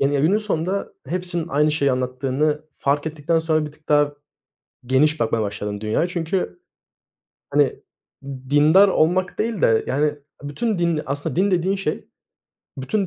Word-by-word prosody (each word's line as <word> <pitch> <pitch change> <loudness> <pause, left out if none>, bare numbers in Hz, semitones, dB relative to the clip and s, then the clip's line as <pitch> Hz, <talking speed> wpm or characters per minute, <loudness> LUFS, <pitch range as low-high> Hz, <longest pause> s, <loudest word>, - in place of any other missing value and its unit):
Gene, 140 0 +2
günün 175 +8 +3
sonunda 195 -2 -2
hepsinin 175 0 -2
aynı 150 +1 +2
şeyi 140 -3 +2
anlattığını 130 +4 -1
fark 145 +3 -1
ettikten 160 +1 0
sonra 160 -1 +1
bir 150 - -9
tık 155 0 -25
daha 145 -1 +3 0.7
geniş 150 +5 +2
bakmaya 115 -1 +1
başladım 105 0 -4
dünyaya. 110 +10 0
Çünkü, 170 - -3 0.9
hani, - - +2 0.7
dindar 155 +8 +6
olmak 185 +1 +1
değil 225 -4 -1
de, 115 -1 +3
yani, 145 +2 0 0.2
bütün 210 +9 -2
din 170 -2 +1
Aslında 145 +1 -3
din 195 +3 +2
dediğin 185 +2 +1
şey, 190 -6 -3 0.7
bütün 195 +9 -1
155 Hz, 140 wpm, -22 LUFS, 140-175 Hz, 0.9 s, dindar